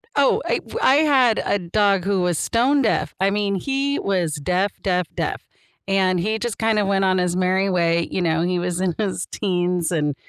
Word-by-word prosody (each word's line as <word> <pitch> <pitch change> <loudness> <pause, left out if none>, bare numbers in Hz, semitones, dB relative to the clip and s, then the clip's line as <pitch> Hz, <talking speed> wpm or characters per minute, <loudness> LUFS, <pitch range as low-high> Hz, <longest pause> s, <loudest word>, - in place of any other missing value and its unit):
Oh, 280 -1 +3
it - - -1
w - - -6
I 265 - +5
had 270 -7 +3
a 205 - 0
dog 195 +1 +1
who 195 -2 0
was 175 -3 0
stone 265 +5 +1
deaf. 155 - 0
I 195 +1 +2
mean, 200 -1 -1
he 275 +7 -1
was 180 -6 -1
deaf, 180 +7 -1
deaf, 180 -2 0
deaf; - - -4 0.4
and, 190 -2 +1
he 215 +5 -1
just 240 -3 -3
kinda 220 -2 +1
went 195 -1 +1
on 185 0 +2
his 180 -1 0
merry 185 +1 +1
way, 170 -2 +1
you 185 - -1
know, 165 -1 +1
he 180 0 0
was 180 +1 -2
in 180 -3 -1
his 195 -5 -3
teens, 180 -3 -1
and 150 -4 -1
190 Hz, 205 wpm, -21 LUFS, 175-210 Hz, 0.4 s, I